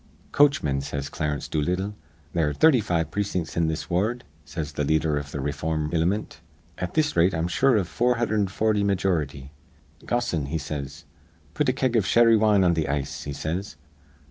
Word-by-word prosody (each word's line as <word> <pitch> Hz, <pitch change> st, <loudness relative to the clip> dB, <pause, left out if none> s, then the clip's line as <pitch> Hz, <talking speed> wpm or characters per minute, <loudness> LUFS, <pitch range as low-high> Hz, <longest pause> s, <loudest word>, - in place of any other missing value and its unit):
'Coachmen,' 110 Hz, -, +3 dB
says 70 Hz, 0 st, -4 dB
Clarence 75 Hz, -2 st, -3 dB
Doolittle. 90 Hz, +7 st, -1 dB, 0.4 s
'There 80 Hz, -3 st, +1 dB
are -, -, -3 dB
thirty 155 Hz, -5 st, +5 dB
five 85 Hz, -5 st, -1 dB
precin'ts 95 Hz, -5 st, -2 dB
in 85 Hz, -1 st, +2 dB
this 80 Hz, 0 st, -3 dB
ward,' 105 Hz, +8 st, 0 dB, 0.2 s
says 75 Hz, +1 st, -5 dB
th' -, -, -11 dB
leader 75 Hz, +1 st, +1 dB
iv 70 Hz, -, -7 dB
th' -, -, -10 dB
rayform 75 Hz, +2 st, -2 dB
ilimint. 90 Hz, +6 st, 0 dB, 0.4 s
'At 90 Hz, -1 st, -4 dB
this 155 Hz, -1 st, +1 dB
rate, 85 Hz, +2 st, +3 dB
I'm 80 Hz, +1 st, 0 dB
sure 130 Hz, +7 st, +3 dB
iv 95 Hz, -4 st, 0 dB
440 110 Hz, -1 st, +1 dB
meejority. 80 Hz, -9 st, -1 dB, 0.6 s
Gossoon,' 105 Hz, -, -1 dB
he 80 Hz, +4 st, -2 dB
says, 75 Hz, -3 st, -6 dB, 0.5 s
'put -, -, +1 dB
a -, -, +2 dB
keg 130 Hz, -2 st, 0 dB
iv 105 Hz, -4 st, +2 dB
sherry 115 Hz, -1 st, +5 dB
wine 105 Hz, -2 st, +4 dB
on 90 Hz, -1 st, +4 dB
th' 80 Hz, -3 st, -1 dB
ice,' 70 Hz, -1 st, -3 dB
he 70 Hz, -, -4 dB
says. 85 Hz, +7 st, -4 dB
85 Hz, 170 wpm, -25 LUFS, 75-105 Hz, 0.6 s, thirty